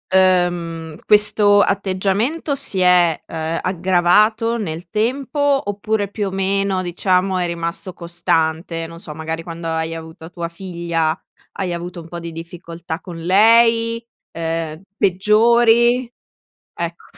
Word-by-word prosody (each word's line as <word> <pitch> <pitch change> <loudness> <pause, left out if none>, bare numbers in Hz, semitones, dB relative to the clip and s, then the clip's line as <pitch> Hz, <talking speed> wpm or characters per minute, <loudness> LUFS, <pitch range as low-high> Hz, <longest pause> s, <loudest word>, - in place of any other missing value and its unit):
uhm, 175 -4 +1
questo 210 -1 +4
atteggiamento 200 - 0
si 260 -8 -3
è, 180 -3 +4
uhm, 160 0 -3
aggravato 190 +6 +2
nel 170 -4 -5
tempo, 255 - -2 0.3
oppure 205 0 -2
più 205 0 -3
o - - -4
meno 195 0 0
diciamo 185 +1 0
è 180 - 0
rimasto 170 +2 -4
costante, 165 -1 -1
non 165 0 -11
so 155 -3 -8
magari 160 +1 -4
quando 165 0 -7
hai 160 0 -2
avuto 160 0 -10
tua 170 -1 -5
figlia 170 -2 -2 0.4
hai 185 -2 -2
avuto 175 0 -6
un 165 - -13
po' 175 - -6
di 170 -1 -7
difficoltà 165 0 -7
con 175 -2 -9
lei, 230 +5 +4 0.3
uhm, 165 -1 -3 0.2
peggiori? 235 +5 +3 0.6
Ecco 170 0 -5
180 Hz, 125 wpm, -19 LUFS, 165-205 Hz, 0.6 s, questo